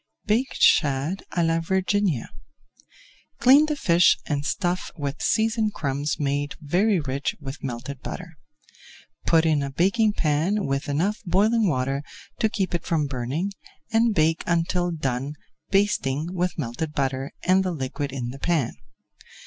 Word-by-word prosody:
BAKED 235 +5 0
SHAD 145 +5 +3
À 170 -2 +2
LA 165 0 +2
VIRGINIA 190 - 0 1.1
Clean 280 +5 +6
the 305 - -1
fish 175 -10 +4
and 145 -1 -1
stuff 180 +3 -1
with 145 -1 -4
seasoned 220 -1 +1
crumbs 145 +1 -2
made 145 0 -1
very 180 +7 +2
rich 140 -1 -2
with 135 -1 -8
melted 135 +1 -5
butter. 170 -3 -7 0.9
Put 165 0 +4
in 155 -3 +3
a 140 - -2
baking 200 - +2
pan 170 +6 +1
with 135 +1 -2
enough 180 +10 0
boiling 215 +5 +3
water 135 -2 0 0.4
to 220 - +2
keep 195 -3 -2
it 170 - -1
from 160 -4 0
burning, 140 +9 -3 0.4
and 225 -1 +3
bake 160 +1 +2
until 170 +1 +1
done, 140 -3 -2 0.3
basting 175 -6 +1
with 180 0 -1
melted 150 +2 -3
butter 135 +1 -1
and 185 +1 +4
the 185 - -1
liquid 140 -1 -4
in 125 -2 -4
the 135 - -10
pan. 160 -6 0
165 Hz, 145 wpm, -24 LUFS, 140-190 Hz, 1.1 s, Clean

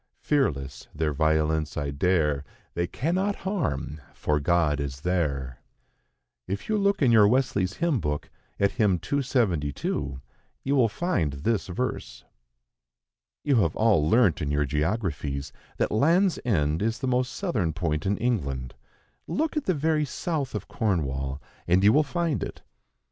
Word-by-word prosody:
Fearless, 70 - -1
their 75 -1 0
violence 80 0 +1
I 70 -1 -2
dare; 75 -2 +1 0.3
They 85 0 -1
cannot 180 - -1
harm, 80 - -2
for 75 -1 0
God 75 -1 +2
is 70 -1 -4
there." 70 -8 -1 0.9
If 100 +2 -4
you 215 -1 +1
look 200 -5 +2
in 125 - +5
your 110 -3 +7
Wesley's 105 -6 +1
Hymn 165 -3 0
Book, 75 -4 -3 0.3
at 100 0 +3
hymn 105 -7 +2
272, 85 - -1 0.4
you 140 +1 +1
will 120 -5 +4
find 115 - -1
this 95 +10 -1
verse. 125 +8 -4 1.2
You 140 -4 +3
have 85 -8 +2
all 100 -9 +3
learnt, 110 -5 +4
in 75 - -1
your 75 0 +1
geographies, 75 - -2 0.2
that - - 0
Land's 170 - +3
End 80 -8 +1
is 115 +2 0
the 125 - -4
most 125 0 +1
southern 170 - -1
point 80 -2 -2
in 100 +1 +1
England; 70 - -2 0.5
look 315 +2 -1
at 300 - -1
the 185 - +1
very 155 +1 +1
south 145 0 -3
of - - -4
Cornwall, 70 - -1 0.3
and 90 +2 +3
you 105 +2 +6
will 150 - +5
find 165 +1 -1
it. - - -6
95 Hz, 150 wpm, -26 LUFS, -, 1.2 s, your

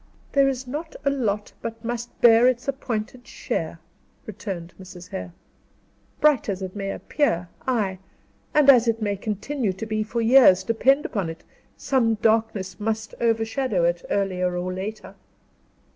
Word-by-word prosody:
"There 275 -1 +4
is 265 -1 -2
not 300 +6 -6
a 280 - +3
lot 210 -6 -2
but 225 0 -6
must 240 0 -5
bear 235 +1 +7
its 255 0 0
appointed 245 -2 -4
share," 165 0 -4 0.5
returned 190 -5 -6
Mrs. 180 -1 -11
Hare. 90 -1 -6 0.9
"Bright 295 -7 +3
as 190 -1 -3
it 185 +1 -6
may 195 -1 -3
appear, 180 - -1 0.2
ay, 205 -7 0 0.5
and 300 -2 +4
as 245 -4 +7
it 225 -1 +1
may 205 -2 -1
continue 215 +3 -2
to 195 +4 -6
be 215 -1 -1
for 220 +2 -3
years, 230 -6 +6
depend 265 +7 +2
upon 195 -7 -2
it, 165 0 -9 0.3
some 235 -5 +1
darkness 220 -3 0
must 220 0 -2
overshadow 225 -2 +1
it, 170 0 +1
earlier 185 -2 0
or 180 +1 -3
later." 190 0 -6
220 Hz, 150 wpm, -24 LUFS, 190-245 Hz, 0.9 s, bear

